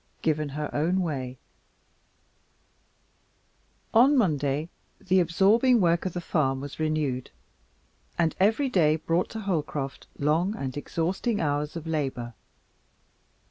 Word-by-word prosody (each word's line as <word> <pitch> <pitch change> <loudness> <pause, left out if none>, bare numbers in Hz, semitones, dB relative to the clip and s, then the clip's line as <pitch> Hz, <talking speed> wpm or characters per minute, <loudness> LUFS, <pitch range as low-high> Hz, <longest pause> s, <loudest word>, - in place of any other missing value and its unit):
Given 155 -2 0
Her 150 +2 -3
Own 175 +6 +1
Way 130 -7 -3 2.6
On 265 +6 +6
Monday 150 - +1 0.3
the 190 0 +2
absorbing 205 +9 +4
work 170 -1 +2
of 180 - -5
the 175 - -3
farm 135 -6 0
was 140 +2 -8
renewed, 155 -5 -1 0.9
and 165 -2 +1
every 220 +9 +3
day 160 -10 +3
brought 165 +2 0
to 220 - -6
Holcroft 150 -8 -3
long 165 +8 +1
and 130 - -4
exhausting 180 +9 -1
hours 150 0 -1
of 165 -1 -6
labor. 135 -7 -2
160 Hz, 115 wpm, -27 LUFS, 145-185 Hz, 2.6 s, On